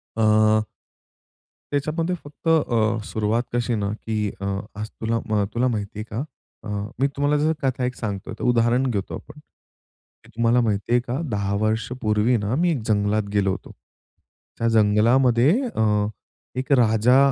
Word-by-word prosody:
अ 110 0 +4 1.1
त्याच्यामध्ये 160 +5 -1
फक्त 145 +3 -11
अ, 115 -8 +2
सुरुवात 110 +3 0
कशी 120 0 0
ना, 100 -2 -1 0.2
की 105 -2 -1
अ, 100 - -3 0.3
आज 110 - -4
तुला 115 +1 -2
म 105 -2 +2
तुला 125 +2 +1
माहिती 105 -3 -3
आहे 110 - -3
का? 120 +6 -2 0.4
अ, - - -8 0.3
मी 135 - +3
तुम्हाला 145 +1 +2
जस 160 +1 +3
कथा 130 -1 0
एक 125 - -3
सांगतो 105 0 -5
आहे 110 - -5
त - - -8
उदाहरण 120 +1 +3
घेतो 100 -4 -3
आपण, 150 0 -11 0.8
की - - -19
तुम्हाला 115 +1 +3
माहिती 105 -2 -1
आहे 125 - +5
का 125 +4 -2
10 100 -1 -1
वर्षांपूर्वी 110 0 0
आहे 120 - +4
ना 105 +5 0
मी 175 -1 +3
एक 135 -8 -1
जंगलात 105 0 +1
गेलो 100 -2 +2
होतो. - - -6 0.9
त्या 115 - 0
जंगलामध्ये 115 +5 +4 0.2
अ, 105 -1 +2 0.5
एक 130 +2 -3
राजा 110 +3 +4
115 Hz, 165 wpm, -23 LUFS, 105-125 Hz, 1.1 s, आहे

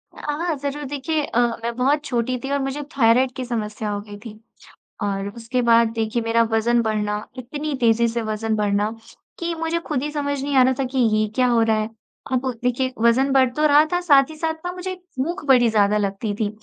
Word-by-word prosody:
हाँ, 310 +2 -2
ज़रूर। 285 +1 -4
देखिए 290 +3 -2
अ, 240 - -1 0.2
मैं 235 0 -2
बहुत 280 +4 +1
छोटी 250 0 -1
थी 270 - -4
और 280 - +1
मुझे 270 +2 -3 0.2
थाइरॉइड 250 +1 +4
की 260 -2 -4
समस्या 215 -3 -3
हो 205 0 -2
गई 205 0 -10
थी। 215 -1 -9 0.6
और 195 0 -2
उसके 240 +2 -2
बाद 230 -1 +5
देखिए 225 +1 -1
मेरा 230 0 +3
वज़न 235 +2 +2
बढ़ना 210 -1 -2
इतनी 290 +5 -4
तेज़ी 235 -1 +3
से 230 0 -2
वज़न 220 0 -2
बढ़ना 205 0 0 0.5
कि 340 0 -2
मुझे 325 +1 -1
खुद 285 -3 -1
ही 300 - -3
समझ 285 -2 -2
नहीं 285 -1 -2
आ 260 - +8
रहा 260 +1 +3
था 270 - +2
कि 265 - -1 0.2
ये 215 0 +2
क्या 255 -1 +3
हो 235 -2 +3
रहा 220 -1 +2
है। 215 +1 -2 0.4
अब 260 +1 0 0.2
देखिए 255 +1 0
वज़न 255 +4 +3
बढ़ 260 -2 +4
तो 305 0 +2
रहा 295 +1 +6
था 355 - +2
साथ 280 -5 +5
ही 315 - -9
साथ 320 +1 -4
मुझे 370 +1 -4 0.3
भूख 335 +6 -2
बड़ी 250 -3 +5
ज़्यादा 210 -1 +3
लगती 205 +1 -2
थी। 210 -1 -1
250 Hz, 215 wpm, -22 LUFS, 220-285 Hz, 0.6 s, आ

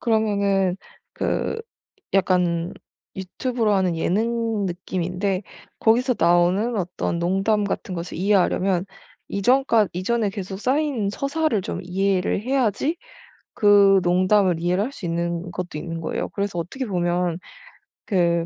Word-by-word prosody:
그러면은 200 -5 +1 0.4
그 450 - -2 0.5
약간 180 -2 +2 0.4
유튜브로 220 +4 -1
하는 185 -3 +1
예능 225 +4 0
느낌인데 185 +2 -2 0.4
거기서 245 +3 +3
나오는 175 +7 +3
어떤 180 -2 -2
농담 195 +5 +1
같은 195 -1 -3
것을 170 0 -5
이해하려면 190 -1 +2 0.5
이전까 230 +1 +3
이전에 210 +4 0
계속 195 -1 -6
쌓인 260 -3 0
서사를 275 0 0
좀 210 - -4
이해를 190 +1 0
해야지 260 - 0 0.6
그 200 -2 +6
농담을 185 0 +3
이해를 180 +4 +1
할 265 - -5
수 185 - -7
있는 170 +1 -2
것도 175 -2 -5
있는 165 +1 -5
거예요. 160 - -3
그래서 200 -3 -3
어떻게 260 +10 -5
보면 175 -3 0 0.7
그 170 -3 +1
195 Hz, 275 characters per minute, -23 LUFS, 175-220 Hz, 0.7 s, 그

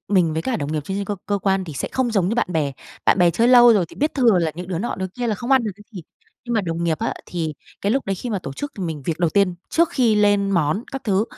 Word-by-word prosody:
mình 180 -5 +3
với 160 +1 -2
cả 255 +3 -1
đồng 145 -6 -3
nghiệp 155 - -1
trên 190 - -4
trên 200 - -2
cơ 205 +1 -3
cơ 205 -1 0
quan 195 -1 0
thì 160 - -8
sẽ 135 - -4
không 260 -2 0
giống 195 -5 +1
như 220 - 0
bạn 240 - +1
bè. 150 -4 0 0.3
Bạn - - +4
bè 175 -1 +5
chơi 230 +8 +2
lâu 240 -1 +8
rồi 200 -5 +3
thì - - -15
biết 300 +3 0
thừa 235 -8 +4
là 165 -2 +1
những 175 +2 -7
đứa 180 -3 -2
nọ, 235 +7 -2
đứa 190 - -3
kia 240 +7 -5
là 220 - 0
không 240 +6 -6
ăn 260 -3 +4
được 215 - -1
cái 210 - -15
gì, 185 -5 -7 0.4
nhưng 240 - -4
mà 220 - +3
đồng 170 -2 -3
nghiệp 160 -2 0
á, - - -2
thì 160 -3 -3 0.3
cái 200 - 0
lúc 270 +2 -1
đấy 195 - 0
khi 240 +6 -6
mà 205 - -1
tổ 135 -7 -7
chức 290 - -6
thì 195 - -3
mình 160 -4 -4
việc 160 +1 -2
đầu 170 -2 +1
tiên, 195 -2 +2 0.2
trước 335 0 +3
khi 240 -5 +2
lên 205 -1 +3
món 175 +4 +1
các 270 - -5
thứ, 200 0 +2
195 Hz, 320 wpm, -21 LUFS, 170-230 Hz, 0.4 s, lâu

